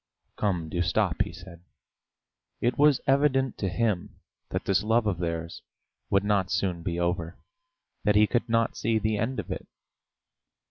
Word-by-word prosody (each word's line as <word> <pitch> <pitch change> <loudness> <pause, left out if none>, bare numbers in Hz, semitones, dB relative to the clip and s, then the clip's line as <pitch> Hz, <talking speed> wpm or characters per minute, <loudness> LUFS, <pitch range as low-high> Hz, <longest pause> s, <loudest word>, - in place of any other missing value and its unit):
"Come, 90 -6 -1
do 85 +2 -2
stop!" 85 - +1
he - - 0
said. 85 0 -12 1.0
It 120 +1 +1
was 145 -2 +4
evident 135 -2 +2
to 95 - 0
him 105 -1 -1 0.3
that - - -3
this 95 0 +2
love 110 +2 +2
of 95 -5 0
theirs 85 -1 -3 0.5
would 100 0 +3
not 100 -3 +1
soon 90 -4 -1
be 85 0 -3
over, 85 -1 -1 0.7
that 105 0 +3
he 105 +1 +6
could 120 +2 -1
not 115 0 +2
see 115 0 +1
the 110 -1 0
end 125 +4 -1
of - - -5
it. - - -5
100 Hz, 165 wpm, -27 LUFS, 85-115 Hz, 1.0 s, he